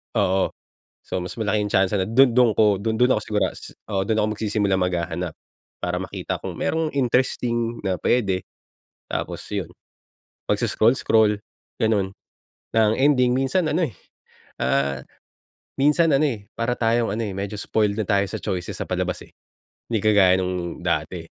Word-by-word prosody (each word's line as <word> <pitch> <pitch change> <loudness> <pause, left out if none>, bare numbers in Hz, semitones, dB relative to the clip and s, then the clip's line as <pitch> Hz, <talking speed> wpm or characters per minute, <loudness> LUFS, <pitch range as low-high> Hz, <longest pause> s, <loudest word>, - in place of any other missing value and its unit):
oo. 95 0 +1 0.4
So, 90 - -4
mas 90 - -6
malaki 105 -1 +1
yung 105 - -4
tiyansa 95 +2 +2
na 95 - +1
dun 120 +4 +4
dun 125 -3 +5
ko 105 -1 +4
dun 110 +3 -2
dun 125 +1 +5
ako - - 0
sigura 105 -1 0 0.4
Oo, 95 - +2
dun 110 +2 0
ako 110 0 0
magsisimulang 100 -3 0
maghahanap. 90 -1 -2 0.5
Para - - -2
makita - - -4
kung - - -6
mayro'ng 160 -1 0
interesting 120 -3 0
na 95 - +1
pwede. 100 -7 +1 0.7
Tapos, - - -3
yun - - -4 0.8
pag-scroll-scroll 110 -3 +3 0.4
ganun. 105 -4 +1 0.6
Na 110 -1 +4
ang 110 - +2
ending, 130 -3 +3
minsan 135 +6 +1
ano, 170 +4 +1
eh, 120 - -3 0.7
ah, 70 +1 0 0.8
minsan 155 +3 +4
ano, 135 - +4
eh, 110 -8 -3
para 115 +1 0
tayong 115 -1 +1
ano 115 +1 -2
medyo 100 +1 -4
spoiled 105 0 0
na 110 - 0
tayo 100 -1 +4
sa - - -4
choices 90 -2 -3
sa - - -4
palabas, - - -2
eh. - - -25 0.6
Hindi 110 - +2
kagaya 100 -4 +5
nung 90 -2 -3
dati - - -2
110 Hz, 155 wpm, -23 LUFS, 95-120 Hz, 0.8 s, dun